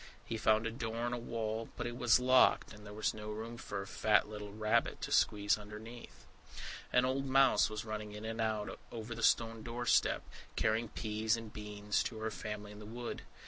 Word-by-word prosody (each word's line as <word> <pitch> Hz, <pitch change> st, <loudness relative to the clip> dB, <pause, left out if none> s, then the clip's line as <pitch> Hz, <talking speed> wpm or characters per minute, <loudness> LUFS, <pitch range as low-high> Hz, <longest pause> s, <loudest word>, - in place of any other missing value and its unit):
He 115 Hz, -, -3 dB
found 110 Hz, 0 st, +3 dB
a 115 Hz, -, -1 dB
door 115 Hz, 0 st, -3 dB
in 120 Hz, -, -1 dB
a -, -, -1 dB
wall; 115 Hz, -1 st, -3 dB
but 120 Hz, -, -3 dB
it 120 Hz, 0 st, -3 dB
was 120 Hz, 0 st, +5 dB
locked, 130 Hz, -2 st, +5 dB
and 105 Hz, 0 st, -13 dB
there 105 Hz, -, -9 dB
was 110 Hz, +1 st, 0 dB
no 105 Hz, 0 st, -7 dB
room 110 Hz, +2 st, -5 dB
for 100 Hz, -4 st, -5 dB
a -, -, -9 dB
fat 105 Hz, +2 st, +3 dB
little 105 Hz, -1 st, -7 dB
rabbit 110 Hz, +1 st, +1 dB
to -, -, -4 dB
squeeze 105 Hz, 0 st, +3 dB
underneath. 110 Hz, +3 st, -10 dB, 0.7 s
An 125 Hz, 0 st, +4 dB
old 135 Hz, +1 st, 0 dB
mouse 135 Hz, -6 st, +5 dB
was 110 Hz, +1 st, -4 dB
running 110 Hz, -1 st, -4 dB
in 105 Hz, +1 st, -7 dB
and 115 Hz, 0 st, -3 dB
out 110 Hz, -2 st, -1 dB
over 115 Hz, 0 st, -5 dB
the -, -, -6 dB
stone 115 Hz, -1 st, +3 dB
doorstep, 120 Hz, +1 st, +2 dB, 0.3 s
carrying 110 Hz, +2 st, +1 dB
peas 110 Hz, +1 st, 0 dB
and 115 Hz, -2 st, -8 dB
beans 105 Hz, -1 st, -1 dB
to 115 Hz, -, -3 dB
her 110 Hz, 0 st, -2 dB
family 105 Hz, -1 st, -5 dB
in 105 Hz, -, -10 dB
the 105 Hz, -, -9 dB
wood. 120 Hz, +2 st, -5 dB
110 Hz, 205 wpm, -34 LUFS, 105-115 Hz, 0.7 s, was